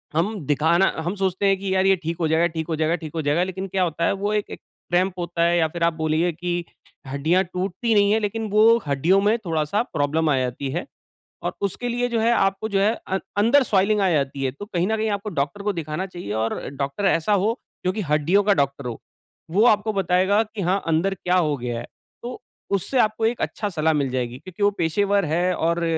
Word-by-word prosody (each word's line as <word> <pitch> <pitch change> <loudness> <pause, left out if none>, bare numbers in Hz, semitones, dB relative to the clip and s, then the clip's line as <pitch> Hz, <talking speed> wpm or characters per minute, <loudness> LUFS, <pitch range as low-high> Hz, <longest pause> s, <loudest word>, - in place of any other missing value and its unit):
हम 195 +7 +1
दिखाना 165 +6 +3
हम 180 - -2
सोचते 190 0 -1
हैं 195 -1 +3
कि 195 -1 -2
यार 190 0 +2
ये 195 - +5
ठीक 165 0 -4
हो 160 - +2
जाएगा, 165 +2 +3
ठीक 160 -1 -5
हो 160 - 0
जाएगा, 160 +2 +1
ठीक 155 -3 -7
हो 160 - 0
जाएगा, 150 +5 +1
लेकिन 190 +1 -4
क्या 190 0 0
होता 170 0 -1
है - - +2
वो 205 +2 -2
एक 210 -1 -1
एक - - -7 0.3
क्रैम्प 185 +1 +2
होता 170 -1 -1
है 170 0 +3
या 160 - +3
फिर 170 +2 -4
आप 170 -1 +3
बोलिए 160 +2 0
कि 175 +1 -3 0.4
हड्डियाँ 155 +8 +1
टूटती 190 +5 -1
नहीं 200 0 +4
है, 220 - +3
लेकिन 215 +1 -3
वो 220 +2 +6
हड्डियों 165 +8 +3
में 215 +3 +3
थोड़ा-सा 160 +6 0
प्रॉब्लम 155 +2 +1
आ 140 - +3
जाती 130 +2 -3
है। 175 - -3 0.6
और - - -2
उसके 200 +5 -2
लिए 245 +1 0
जो 230 -1 0
है, 230 +2 +3
आपको 195 +1 +1
जो 195 - +1
है, 215 +3 +3
अ, 190 0 -1 0.2
अंदर 235 +7 +5
स्वेलिंग 205 -1 +2
आ 190 - +3
जाती 140 -2 -1
है, 130 - 0
तो 145 +10 -9
कहीं 185 -3 -1
न 220 0 0
कहीं 220 0 0
आपको 200 +1 -3
डॉक्टर 175 +9 -4
को 205 0 0
दिखाना 165 +2 -3
चाहिए 175 - -8
और 115 - -2 0.2
डॉक्टर 140 +8 -2
ऐसा 185 +2 +2
हो 215 +5 +1 0.3
जोकि 185 +4 0
हड्डियों 165 +7 +3
का 205 - +4
डॉक्टर 140 -4 -1
हो 115 - -5 0.5
वो 200 +6 +3
आपको 215 -1 +3
बताएगा 190 +2 +2
कि 215 -1 -7
हाँ 185 +3 +1
अंदर 165 +5 +1
क्या 180 0 0
हो 155 -5 +2
गया 120 -1 -4
है। 120 - -7 0.4
तो 245 +1 -6 0.3
उससे 245 +7 -1
आपको 215 0 +2
एक 230 +2 0
अच्छा 210 -2 -2
सलाह 160 -2 +1
मिल 140 -3 0
जाएगी। 125 -1 -2
क्योंकि 185 +2 -6
वो 205 - +5
पेशेवर 200 +4 +1
है 175 +4 +1
और 170 +1 0
180 Hz, 230 wpm, -23 LUFS, 160-205 Hz, 0.6 s, वो